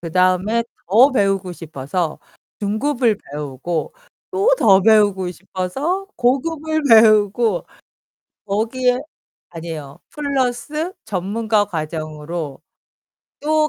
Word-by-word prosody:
그다음에 185 Hz, +6 st, +1 dB, 0.2 s
더 235 Hz, +9 st, +6 dB
배우고 195 Hz, -5 st, +1 dB
싶어서 160 Hz, 0 st, -4 dB, 0.4 s
중급을 230 Hz, +2 st, +1 dB, 0.2 s
배우고 150 Hz, +3 st, -4 dB, 0.4 s
또 390 Hz, +5 st, +1 dB
더 195 Hz, -3 st, +6 dB
배우고 205 Hz, -3 st, +3 dB
싶어서 265 Hz, -, -3 dB
고급을 315 Hz, +5 st, 0 dB
배우고 215 Hz, -2 st, +5 dB, 0.8 s
거기에 245 Hz, +5 st, +1 dB, 0.5 s
아니에요. 160 Hz, -3 st, -7 dB
플러스 285 Hz, +3 st, -2 dB
전문가 210 Hz, +2 st, 0 dB
과정으로 155 Hz, -3 st, -5 dB, 0.8 s
또 310 Hz, +1 st, +2 dB
205 Hz, 215 characters per minute, -20 LUFS, 175-250 Hz, 0.8 s, 더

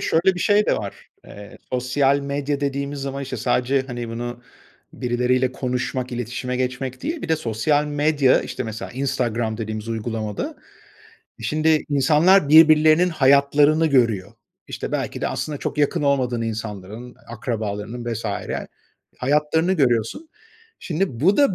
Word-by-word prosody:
şöyle 170 Hz, +4 st, +2 dB
bir -, -, -6 dB
şey 210 Hz, +2 st, +3 dB
de -, -, +2 dB
var. 100 Hz, -2 st, -7 dB, 0.2 s
Eee, 100 Hz, 0 st, -12 dB
sosyal 135 Hz, +2 st, +2 dB
medya 140 Hz, 0 st, -2 dB
dediğimiz 140 Hz, 0 st, -2 dB
zaman, 140 Hz, 0 st, -4 dB
işte, 130 Hz, -1 st, -5 dB
sadece, 125 Hz, +4 st, +1 dB
hani, 120 Hz, -2 st, -5 dB
bunu 120 Hz, +1 st, -6 dB, 0.5 s
birileriyle 125 Hz, +1 st, 0 dB
konuşmak, 125 Hz, 0 st, -3 dB
iletişime 125 Hz, +1 st, -3 dB
geçmek 130 Hz, 0 st, -3 dB
değil, 315 Hz, +4 st, -3 dB
bir -, -, -5 dB
de 160 Hz, -, +2 dB
sosyal 145 Hz, +3 st, 0 dB
medya, 145 Hz, -2 st, +2 dB
işte, -, -, -5 dB
mesela, 110 Hz, -1 st, -6 dB
Instagram 120 Hz, -4 st, -1 dB
dediğimiz 110 Hz, 0 st, -5 dB
uygulamada, 110 Hz, -2 st, -4 dB, 0.8 s
şimdi 155 Hz, +6 st, +1 dB
insanlar 150 Hz, +5 st, +4 dB
birbirlerinin 155 Hz, +2 st, +6 dB
hayatlarını 145 Hz, +1 st, +4 dB
görüyor. 115 Hz, -10 st, +1 dB, 0.3 s
İşte, -, -, -6 dB
belki -, -, -3 dB
de -, -, 0 dB
aslında 150 Hz, -2 st, -4 dB
çok -, -, -4 dB
yakın 145 Hz, 0 st, +1 dB
olmadığın 130 Hz, -4 st, +1 dB
insanların, 110 Hz, +1 st, -6 dB
akrabalarının 115 Hz, 0 st, -4 dB
vs. 115 Hz, +1 st, -5 dB, 0.9 s
hayatlarını 150 Hz, +6 st, +1 dB
görüyorsun. 130 Hz, -, 0 dB, 0.5 s
Şimdi, 160 Hz, -8 st, -2 dB
bu 190 Hz, +6 st, +4 dB
da 280 Hz, -9 st, +4 dB
130 Hz, 135 wpm, -22 LUFS, 120-150 Hz, 0.9 s, birbirlerinin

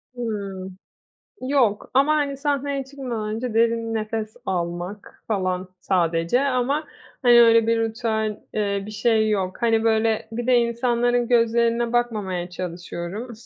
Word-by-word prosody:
Hımm. 195 Hz, -5 st, -5 dB, 0.6 s
Yok. 255 Hz, -6 st, +1 dB
Ama, 275 Hz, +4 st, +4 dB
hani, 285 Hz, -2 st, 0 dB
sahneye 280 Hz, -1 st, -1 dB
çıkmadan 255 Hz, -6 st, -5 dB
önce 235 Hz, 0 st, -4 dB
derin 230 Hz, 0 st, +1 dB
nefes 220 Hz, 0 st, -3 dB
almak 175 Hz, +2 st, -4 dB
falan 185 Hz, -3 st, -1 dB
sadece 170 Hz, +4 st, +1 dB
ama, 275 Hz, +2 st, 0 dB, 0.4 s
hani, 240 Hz, -2 st, +7 dB
öyle 230 Hz, -1 st, +5 dB
bir 230 Hz, 0 st, +2 dB
ritüel, 220 Hz, -2 st, -1 dB
eee, 200 Hz, -2 st, 0 dB
bir 215 Hz, -, -7 dB
şey 220 Hz, 0 st, +2 dB
yok. 190 Hz, +1 st, -2 dB
Hani, 225 Hz, -1 st, +2 dB
böyle, 220 Hz, 0 st, +1 dB
bir 240 Hz, +1 st, -3 dB
de 255 Hz, -, +4 dB
insanların 240 Hz, 0 st, +1 dB
gözlerine 235 Hz, 0 st, +2 dB
bakmamaya 205 Hz, -7 st, -1 dB
çalışıyorum. 180 Hz, +5 st, -6 dB
225 Hz, 130 wpm, -23 LUFS, 200-240 Hz, 0.6 s, hani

